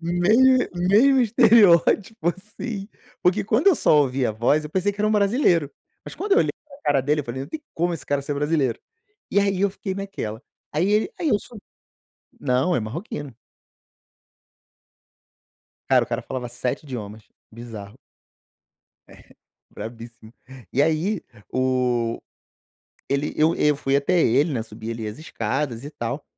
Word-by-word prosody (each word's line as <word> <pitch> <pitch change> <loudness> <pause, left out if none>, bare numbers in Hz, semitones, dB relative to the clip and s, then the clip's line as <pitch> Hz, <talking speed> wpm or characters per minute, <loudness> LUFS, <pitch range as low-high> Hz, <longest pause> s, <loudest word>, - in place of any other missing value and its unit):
mesmo 210 +10 +4 0.2
mesmo 215 +10 +4
estereótipo, 220 -3 +4
assim, 210 +1 -7 0.4
porque, 185 +4 +3
quando 225 - +3
eu 370 - +6
só 155 - +3
ouvi 130 -2 0
a 110 - -1
voz, 125 +8 +2
eu 150 - -7
pensei 190 +3 0
que 205 - -8
era 210 - +2
um - - +1
brasileiro, 200 - +2 0.3
mas - - -9
quando 400 0 -2
eu 420 - +6
olhei - - +2 0.2
para 280 -2 -14
cara 140 -2 +2
dele, 150 +3 +1
eu - - -17
falei: 120 +2 -5
"Não 140 - -6
tem 310 - -6
como 175 +1 0
esse 140 -4 -9
cara 145 0 0
ser 145 +1 -4
brasileiro". 145 -4 0 0.5
E 200 - +3
aí 200 -1 0
eu 200 - +3
fiquei 195 -1 -5
naquela. 165 - -5 0.3
Aí 175 +7 +1
ele 215 - +2
aí 320 - 0
eu 210 - +3
sub 225 +1 -13 0.8
Não, 135 +6 +1
é - - +1
marroquino. 145 - -6 2.6
Cara, - - +5
o - - -9
cara - - -2
falava 125 -2 -5
7 125 +4 -3
idiomas, 110 -6 -7 0.3
bizarro. 110 -2 -10 1.1
É, - - -16 0.5
bravissimo. 115 0 -10 0.4
E 140 - +3
aí 160 +5 0 0.3
o 125 -3 0 0.9
ele 140 +2 -1
eu 160 +2 +3
eu 150 0 +2
fui 135 0 +1
até 170 +5 +2
ele, 140 +4 +3
né. 115 -4 -1
Subi 110 +1 -8
ali 115 -1 -5
as 105 +4 -6
escadas 140 -5 -3
e 145 - -7
tal, 135 0 -5
150 Hz, 160 wpm, -23 LUFS, 125-200 Hz, 2.6 s, eu